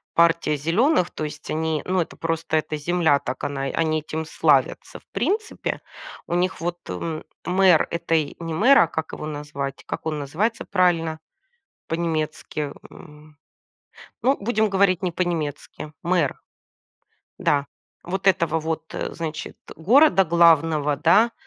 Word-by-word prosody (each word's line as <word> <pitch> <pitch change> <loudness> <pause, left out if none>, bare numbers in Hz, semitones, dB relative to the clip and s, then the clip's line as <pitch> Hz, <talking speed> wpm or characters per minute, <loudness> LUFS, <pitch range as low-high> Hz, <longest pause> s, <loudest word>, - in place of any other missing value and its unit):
партия 170 -2 +3
"зелёных", 180 - +2
то - - -5
есть 150 0 -7
они, 160 -1 -1
ну, 185 -1 +1
это - - -6
просто 165 -1 -1
эта 155 0 -2
земля, 160 -1 +2
так 130 -1 -6
она 140 -1 -2
они 155 +3 0
этим 155 +1 -5
славятся. - - +1
В - - -32
принципе, 435 +3 -2 0.5
у - - -3
них 180 -1 0
вот, 175 +1 -2
м, 155 - -4 0.2
мэр 180 -2 +4
этой, 165 -3 0
не 165 -1 -4
мэр, 250 +11 +5
а, - - +5
как 160 +1 -5
его - - -6
назвать, 145 -2 -5
как - - -6
он 155 -2 -2
называется 175 +12 -2
правильно 170 -5 +1 0.7
по-немецки, 155 -3 -2 0.2
м, 150 0 -15 0.9
ну, 270 +3 +3
будем 215 0 +1
говорить 195 -2 +2
не 180 - 0
по-немецки- 160 -3 -3
мэр. 175 0 +1 1.0
Да, 145 -1 +2 0.4
вот 190 +2 -3
этого 170 -3 +3
вот, 160 0 -3
э, - - -4
значит, 160 -2 -6
э, - - -8
города 215 - +5
главного, 160 -3 +4
да, 225 +10 +4
165 Hz, 145 wpm, -23 LUFS, 155-180 Hz, 1.0 s, мэр